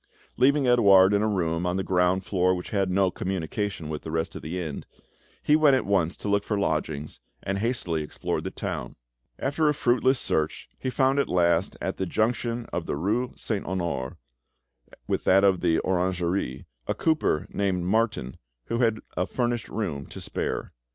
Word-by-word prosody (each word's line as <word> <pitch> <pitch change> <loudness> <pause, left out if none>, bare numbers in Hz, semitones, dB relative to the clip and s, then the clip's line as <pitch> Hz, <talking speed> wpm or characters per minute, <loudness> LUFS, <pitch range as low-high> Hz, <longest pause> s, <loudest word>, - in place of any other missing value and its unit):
Leaving 140 +1 +3
Edouard 100 -5 +6
in 100 - +3
a 110 - +2
room 85 -4 0
on 90 +1 0
the 95 - -1
ground 90 0 +2
floor 95 -1 +2
which 90 - -7
had 100 -2 +1
no 95 0 +2
communication 95 -1 -3
with 75 -1 -4
the - - -7
rest 80 +1 -2
of - - -6
the 85 +4 -4
inn, 80 -5 -4 0.6
he 150 - +4
went 150 -3 +5
at 130 - 0
once 95 -4 +1
to - - -6
look 100 0 +2
for 105 - -1
lodgings, 75 -5 -2 0.2
and 100 0 -2
hastily 100 -8 -1
explored 75 - -3
the - - -3
town. - - -5 0.4
After 150 +3 +1
a 150 - +1
fruitless 130 0 +3
search, 80 0 -1
he 130 - -2
found 135 +2 +2
at 140 - +1
last, 85 0 +2
at 95 - -3
the 95 - -2
junction 115 +3 0
of 85 -1 -2
the - - -1
rue 110 - -1
Saint 105 -4 -2
Honore 85 -8 -2 0.9
with - - -1
that 95 +1 +5
of 95 -2 +4
the 85 -2 +3
Orangerie, 90 -6 -1 0.2
a - - 0
cooper 155 - +1
named 95 -3 0
Martin, 100 - 0 0.3
who 115 - -2
had 115 -3 +2
a 90 - 0
furnished 120 -2 -1
room 80 -11 -3
to - - -9
spare. - - -4
95 Hz, 185 wpm, -26 LUFS, 85-115 Hz, 0.9 s, Edouard